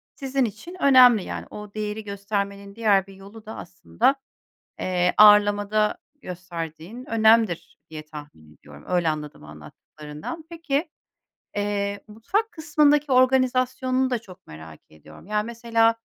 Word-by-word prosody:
sizin 270 -2 -1
için 235 - -8
önemli 250 -7 +6
yani. - - -6
O 210 -1 -10
değeri 215 0 -4
göstermenin 200 0 -4
diğer 205 -4 +2
bir 195 - -13
yolu 200 +3 -14
da 220 - -8
aslında, 175 - -1 0.7
eee, 180 -1 0
ağırlamada 210 0 +5 0.2
gösterdiğin 175 +4 -8
önemdir 220 -5 +2
diye 155 -1 -7
tahmin 145 - -12
ediyorum. 75 0 -16
Öyle 175 -2 +1
anladım 150 - -5
anlattıklarından. 150 - -10
Peki, 325 -2 -2 0.7
eee, 200 0 -2
mutfak 370 - -2
kısmındaki 300 -3 +2
organizasyonunu 255 0 +2
da 245 - 0
çok 190 -4 -16
merak 80 0 -12
ediyorum. 80 - -16
Ya, 210 +1 0
mesela, 230 0 +1
210 Hz, 125 wpm, -24 LUFS, 175-250 Hz, 0.7 s, önemli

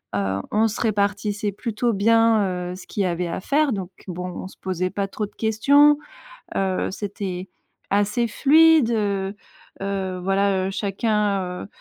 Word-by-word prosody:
heu, 100 -1 -1
on 220 +2 +3
se 215 - -5
répartissait 205 -1 0
plutôt 230 +3 -1
bien, 205 -4 +2
heu, - - -6
ce 185 - -12
qu'il 205 - -2
y - - +1
avait 175 0 -1
à 170 - -4
faire 285 +4 +2
donc 190 -3 -4 0.2
bon, 180 0 -5
on 180 - -7
se - - -15
posait 185 -1 -1
pas 200 -1 -2
trop 210 +2 -3
de 205 - -15
questions, 285 +7 +4 0.6
heu, 190 -1 0
c'était 195 -2 -5 0.4
assez 210 +4 +1
fluide, 310 +2 +5
heu, 200 -3 -1 0.5
heu, 190 -2 -3
voilà, 195 0 +1
heu, - - -3
chacun, 205 0 0 0.2
heu - - -7
200 Hz, 165 wpm, -23 LUFS, 190-220 Hz, 0.6 s, fluide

